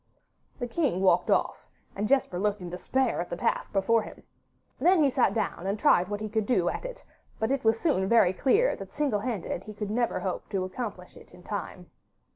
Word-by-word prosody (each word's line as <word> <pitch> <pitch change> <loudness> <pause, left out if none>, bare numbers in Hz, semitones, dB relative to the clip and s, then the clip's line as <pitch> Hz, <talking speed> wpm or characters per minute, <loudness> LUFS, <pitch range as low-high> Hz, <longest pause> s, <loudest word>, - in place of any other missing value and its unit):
The 245 - -3
king 245 - 0
walked 180 -2 +3
off, - - 0 0.3
and 205 +1 -1
Jesper 255 -8 +1
looked 210 +1 0
in 175 -2 -7
despair 245 +6 0
at 175 - -6
the 175 - -4
task - - -1
before 215 +3 +2
him. - - -11 0.6
Then 355 -2 +4
he 280 - +3
sat 255 -1 +3
down 195 -4 -2
and 200 +2 0
tried 180 -3 +4
what 205 +1 -4
he 215 - -2
could 215 0 -1
do 185 -9 +2
at - - -5
it, - - -7 0.3
but 220 +3 -1
it 275 -1 0
was 225 0 +3
soon 190 - +1
very 210 -6 +5
clear 415 - +2
that 195 -1 -10
single 280 -8 +1
handed 205 -5 -4
he 215 - -9
could 210 0 -4
never 235 +2 0
hope 185 -2 -4
to 195 -3 -1
accomplish 185 -2 -6
it - - -15
in 180 - -16
the - - -19
time. 195 -3 -6
210 Hz, 220 wpm, -28 LUFS, 185-250 Hz, 0.6 s, very